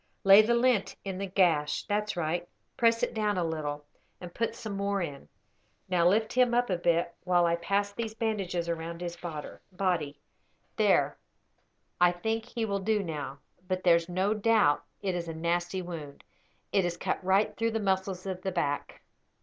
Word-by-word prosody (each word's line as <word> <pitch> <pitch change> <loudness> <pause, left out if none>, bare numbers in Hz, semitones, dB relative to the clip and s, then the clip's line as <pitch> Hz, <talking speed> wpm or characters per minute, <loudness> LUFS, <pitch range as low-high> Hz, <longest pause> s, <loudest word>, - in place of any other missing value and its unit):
Lay 195 +2 +9
the 235 +2 +2
lint 235 -5 +2
in 190 -1 -4
the 195 - -2
gash. 165 -6 +2
That's 210 -1 -2
right. 170 +1 -2 0.3
Press 230 -2 +3
it - - 0
down 210 -2 0
a 180 - +1
little, 150 -3 -3 0.3
and 175 -1 -9
put 230 -1 -1
some 215 -3 -6
more 200 0 0
in. 145 -6 -5 0.6
Now 175 -2 +3
lift 215 +4 +2
him 250 -1 +3
up 245 -3 +2
a 180 - +1
bit, 170 0 +1
while 175 -1 +3
I 170 0 +2
pass 200 +4 0
these 220 +1 -5
bandages 195 -7 -2
round 170 0 -4
his 175 -1 -4
body. 170 -1 -4 0.6
There; - - +2 0.8
I 175 0 +7
think 220 +5 -2
he 235 -2 -3
will 200 -2 -1
do 210 +1 +1
now; 145 -5 -5 0.3
but 185 0 -2
there's 170 -1 +4
no 190 +4 +1
doubt 215 -8 +3 0.2
it 190 -2 0
is 175 -1 -3
a 165 - -5
nasty 175 +3 -1
wound. 155 -5 -8 0.5
It 195 - +3
has 175 -1 -2
cut - - -2
right 190 +3 +2
through 230 0 0
the 225 0 -1
muscles 190 -2 -1
of 185 -1 -4
the 190 - -2
back. 145 -5 -2
185 Hz, 180 wpm, -29 LUFS, 170-205 Hz, 0.8 s, Lay